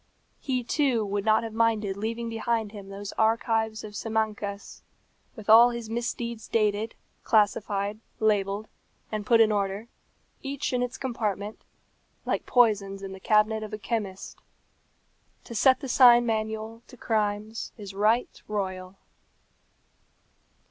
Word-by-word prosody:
He, 255 -3 -2
too, 245 -4 +1
would 200 0 -2
not 220 +1 +4
have 225 -1 -6
minded 220 -3 +1
leaving 230 +3 -3
behind 225 -1 -1
him 200 -2 -10
those 200 0 -7
archives 220 0 +1
of 210 -1 -9
Simancas, 215 -2 -3 0.5
with 215 -4 -11
all 230 +2 +8
his 235 -2 -6
misdeeds 235 -1 -3
dated, 215 0 0 0.3
classified, 205 -1 +1 0.2
labelled, 205 -1 +1 0.4
and 215 -1 -4
put 230 -2 +5
in 220 -1 +5
order, 200 +2 -2 0.5
each 275 -1 -3
in 250 - +1
its 245 -1 -3
compartment, 215 -5 -3 0.6
like - - -2
poisons 200 -5 +2
in 195 - -6
the 190 - -9
cabinet 215 +2 +2
of 215 0 -7
a - - -2
chemist. 205 -2 -4 1.0
To - - -9
set 260 +4 +4
the 275 - -5
sign 240 -2 +7
manual 220 0 -3
to 250 - -14
crimes 215 0 -2
is 200 -3 -8
right 215 +5 +1
royal. 190 -2 -4
220 Hz, 135 wpm, -27 LUFS, 205-230 Hz, 1.0 s, all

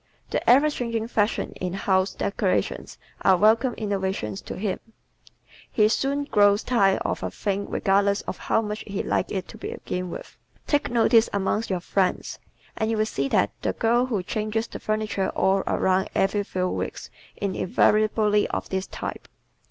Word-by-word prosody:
The - - 0
ever 280 +5 +6
changing 230 -4 -3
fashions 210 -2 0
in 180 -1 -2
house 190 0 +1
decorations 200 -1 -1 0.2
are 190 -1 +5
welcome 225 +5 +3
innovations 190 - -2
to - - -7
him. 195 -1 -2 0.9
He 210 -1 +4
soon 275 +5 0
grows 205 -5 +3
tired 200 -6 +2
of - - -1
a - - -2
thing 200 -1 -3
regardless 200 0 +2
of - - -6
how 225 - +1
much 210 0 -4
he 200 -1 -3
liked - - -1
it 190 -2 -3
to - - -11
begin 180 0 -4
with. - - -8 0.3
Take 290 -1 +1
notice 230 -1 +4
amongst 200 +3 -1
your 185 -2 -1
friends 185 +1 -1 0.4
and 220 - -1
you 225 - 0
will 215 - +2
see 140 -10 -2
that 100 -6 +2
the - - -1
girl 240 +2 +2
who 210 -7 -1
changes 215 +3 -2
the - - -8
furniture 215 -2 -1
all 195 +1 +3
around 190 0 +1
every 195 +2 +2
few 185 -2 -1
weeks - - -5 0.2
is 200 -2 -3
invariably 210 +2 +2
of - - -4
this 190 0 -2
type. - - -6
205 Hz, 165 wpm, -25 LUFS, 190-225 Hz, 0.9 s, ever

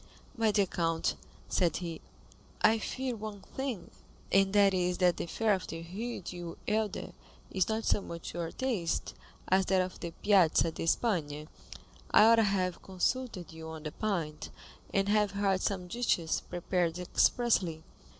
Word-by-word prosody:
"My 225 -3 +2
dear 205 -1 +3
count," 165 -2 0 0.3
said 175 -4 +1
he, 170 -3 -5 0.6
"I 225 0 +5
fear 255 +2 -3
one 210 -2 -7
thing, 265 -9 -4 0.4
and 195 0 +4
that 200 -1 +5
is, 180 -1 +1
that 180 -2 +3
the - - -3
fare 220 +4 +2
of 190 -1 -2
the 165 0 -6
Rue 235 +3 -4
du 175 -1 -7
Helder 215 -2 -1 0.4
is 190 0 +1
not 220 0 -1
so - - +2
much 170 -3 -7
to 175 - -6
your 165 -1 -3
taste 230 -11 -1 0.4
as 190 0 +3
that 190 0 +3
of 185 0 -2
the 170 - -4
Piazza 170 -3 +3
di 165 - -5
Spagna. 155 -8 0 0.6
I - - +7
ought 230 +1 +7
to 225 - +5
have 185 -3 0
consulted 190 -2 -2
you 160 0 -8
on 160 -1 -8
the 155 - -4
point, 170 -8 -3 0.4
and 195 0 +1
have 210 -1 +2
had 195 -2 +1
some 190 -3 -1
dishes 175 -6 0
prepared 175 -1 0
expressly." 180 -2 +2
185 Hz, 165 wpm, -31 LUFS, 170-210 Hz, 0.6 s, I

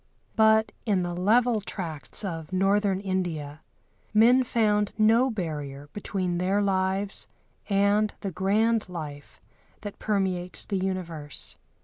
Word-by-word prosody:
But 220 0 +4
in 195 -4 +1
the 175 0 -3
level 220 +5 +3
tracts 180 -1 -5
of 165 -3 -5
Northern 195 +1 +2
India 170 -7 -3 0.5
men 245 +4 +6
found 210 -4 +1
no 225 +4 +4
barrier 145 - -5
between 185 -4 -2
their 190 +3 +1
lives 195 0 0 0.4
and 205 +1 +3
the 195 - -3
grand 210 +4 +1
life 150 -5 -8 0.4
that 205 -2 -7
permeates 190 -4 -1
the 200 - -2
universe. 170 -6 -4
195 Hz, 115 wpm, -27 LUFS, 175-210 Hz, 0.5 s, men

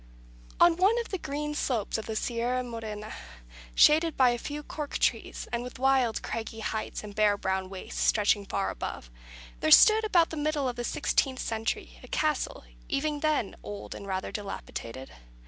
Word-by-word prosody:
On 345 -1 +6
one 395 +6 +4
of 470 - -2
the 380 - -3
green 295 +1 -3
slopes 230 -7 -1
of 220 - -7
the 220 - -3
Sierra 245 +2 -1
Morena, 220 -3 -6 0.6
shaded 315 +1 +5
by 255 -2 +6
a 240 - -2
few 295 +3 -5
cork 295 -1 -4
trees, - - -1
and 235 - -1
with 250 +1 -8
wild 260 -3 +2
craggy 225 0 -5
heights 215 0 -3
and 210 -1 -8
bare 210 -1 +3
brown 190 -1 -2
wastes 190 -1 -6
stretching 205 -1 +3
far 195 0 -1
above, - - -6 0.5
there - - +1
stood, 435 - +8
about 350 -6 +3
the 320 - -5
middle 295 -2 0
of 245 - -2
the 240 - -4
sixteenth 260 +2 0
century, 225 -2 -3
a - - -12
castle 305 -1 -1 0.3
even 295 0 0
then 300 -8 0
old 205 -1 -7
and 200 - -9
rather 190 -1 -3
dilapidated. 135 - -6
245 Hz, 175 wpm, -28 LUFS, 210-300 Hz, 0.6 s, stood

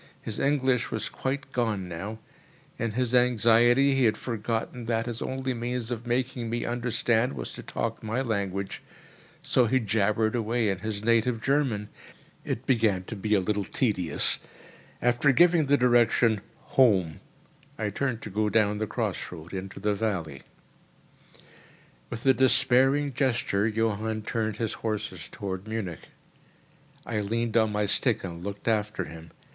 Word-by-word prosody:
His 110 - -6
English 135 -3 +1
was 110 -1 -3
quite 135 +1 -4
gone 110 -6 -1
now. 95 +6 -6 0.6
In 115 -2 -1
his 125 0 0
anxiety 120 +2 +5
he 135 -2 +3
had 110 - +2
forgotten 115 +1 -3
that 115 0 0
his 120 -1 -5
only 130 0 -2
means 120 0 -3
of 120 0 -4
making 125 -1 -1
me 120 +1 -2
understand 120 0 +1
was - - -6
to - - -8
talk - - -4
my 110 +4 -2
language, 100 -4 -2 0.6
so 125 -2 +3
he 130 +4 +3
jabbered 110 0 +1
away 115 -1 +1
in 95 -2 -1
his 105 0 -4
native 115 +1 +2
German. 130 -5 0 0.6
It 120 - -4
began 110 -8 +2
to 110 - -7
be 105 +1 0
a - - +4
little 105 +2 -1
tedious. 95 -5 0 0.6
After 125 +4 +4
giving 170 0 +4
the 145 +1 +4
direction, 120 -3 +3 0.4
"Home!" 95 - +4 0.6
I 105 -1 -2
turned 120 +1 -2
to 105 - -7
go 105 +2 +1
down 105 0 +2
the 110 - -1
cross - - -3
road 85 0 -10
into 95 +1 -6
the 105 +1 +1
valley. 90 -10 -3 1.7
With 115 - -7
a 135 - +6
despairing 135 +2 +3
gesture, 120 -6 +1
Johann 110 0 -1
turned 110 -1 -2
his 110 0 -2
horses 105 -6 -4
towards 95 0 -5
Munich. 110 -7 -5 1.0
I 110 -2 -2
leaned 115 +2 -2
on 110 -2 +3
my 105 0 0
stick 110 +3 +2
and 85 -2 -6
looked 100 +2 -6
after 105 -2 0
him. 80 0 -10
115 Hz, 150 wpm, -27 LUFS, 105-125 Hz, 1.7 s, a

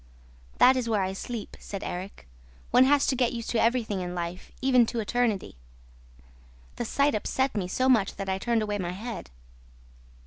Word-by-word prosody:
'That 260 +1 +7
is 250 -3 -1
where 210 -3 +2
I 190 0 -2
sleep,' 225 +2 -6
said 200 -1 -7
Erik. 180 - -6 0.4
'One 255 - +6
has 285 +1 +4
to 265 - +1
get 250 -1 +1
used 230 -1 -4
to 230 - +2
everything 225 -5 +1
in 180 0 -4
life, 175 +1 -5
even 255 -2 +4
to 235 - -3
eternity.' 220 - -1 1.2
The - - -2
sight 280 +5 +2
upset 260 +5 0
me 190 -4 -1
so 255 +8 0
much 225 -7 +3
that 195 - -5
I 190 0 -1
turned 230 +1 +1
away 205 -1 -2
my 175 -1 -3
head. 220 +1 -6
225 Hz, 180 wpm, -27 LUFS, 195-250 Hz, 1.2 s, That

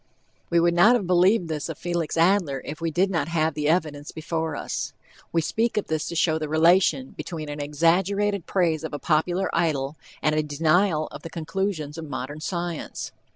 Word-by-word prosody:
We 170 - +3
would 170 0 +3
not 210 +8 +6
have 220 -6 0
believed 180 +2 +3
this 155 -1 -3
of 160 - -5
Felix 170 -2 -2
Adler 165 -6 +2
if 155 +2 -7
we 165 - 0
did 185 +5 +1
not 165 -5 0
have 160 -1 +1
the 150 0 -1
evidence 155 -4 0
before 160 -1 -3
us. - - -4 0.4
We 165 - +2
speak 225 +7 0
of 210 - +1
this 155 -1 -1
to 170 - -5
show 160 -1 +2
the 155 -1 -4
relation 175 - +3
between 155 -4 -6
an 145 0 -5
exaggerated 180 +6 +1
praise 165 -4 +1
of 155 -2 -4
a - - -2
popular 175 +6 +1
idol, 150 -3 0 0.3
and 155 - +3
a 155 - +2
denial 155 +2 +2
of - - -9
the 165 - -7
conclusions 165 -2 -3
of 160 -2 -7
modern 145 +2 -5
science. 170 0 -4
165 Hz, 195 wpm, -25 LUFS, 155-180 Hz, 0.4 s, not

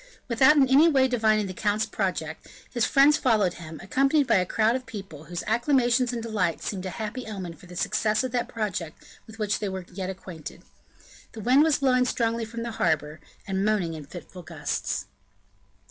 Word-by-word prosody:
Without 265 +5 +5
in 270 -2 +5
any 280 +5 +6
way 265 -4 +4
divining 220 -4 +2
the 185 - -5
count's 210 +2 0
project, 165 -6 -3 0.3
his 240 -2 +2
friends 285 +2 +5
followed 215 -8 +2
him, 160 -2 -9
accompanied 275 - +2
by 235 - +4
a 180 -1 +1
crowd 220 +4 +2
of 255 -1 -5
people, 195 -9 -9
whose 175 +2 -5
acclamations 245 +1 +2
and 235 -2 -4
delight 200 -7 -1
seemed 190 -2 -4
a - - -3
happy 220 +5 -5
omen 190 -5 -6
for 180 +2 -16
the 180 - -11
success 215 +5 +1
of 255 - -3
that 245 -1 -1
project 185 -8 -4 0.3
with 220 0 -12
which 210 -2 -1
they 205 - -2
were 190 -1 -5
yet 190 0 -4
unacquainted. 185 -4 -8 0.7
The 220 - -7
wind 255 +6 +5
was 315 -1 +4
blowing 255 -2 +3
strongly 230 -2 0
from 230 +1 -6
the 235 - -4
harbor, 155 -8 0 0.3
and 195 -1 -1
moaning 205 -6 +1
in 155 -2 -8
fitful 180 +4 -10
gusts. - - -3
215 Hz, 190 wpm, -26 LUFS, 185-245 Hz, 0.7 s, any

